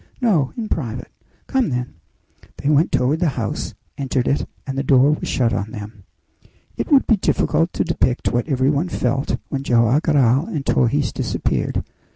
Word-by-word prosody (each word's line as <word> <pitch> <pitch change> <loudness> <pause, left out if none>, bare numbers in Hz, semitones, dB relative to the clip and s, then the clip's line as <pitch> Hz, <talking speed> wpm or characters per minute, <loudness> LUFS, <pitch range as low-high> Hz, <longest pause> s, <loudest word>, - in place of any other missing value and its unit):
"No; 185 - +2
in 225 -2 -3
private." 125 - -4 0.3
"Come, 265 - +1
then." 125 -1 -3 0.6
They 140 - -1
went 150 +3 +3
toward 140 +6 +1
the 175 -3 +2
house, 110 -4 -3 0.2
entered 130 -2 -1
it, 140 - 0 0.2
and 135 - -4
the 135 - 0
door 135 +1 +4
was 150 - -2
shut 120 -3 +1
on 100 +2 -2
them. 105 -2 -9 0.7
It - - -4
would 275 -2 +6
be 225 - +3
difficult 170 -2 +1
to - - 0
depict 135 -6 0
what 120 +3 0
every 135 -1 +2
one 155 +5 0
felt 135 -2 -1
when 135 - -2
Joam 120 0 +3
Garral 140 -1 +3
and 145 -4 -4
Torres 130 +2 +1
disappeared. - - -2
135 Hz, 175 wpm, -20 LUFS, 125-155 Hz, 0.7 s, would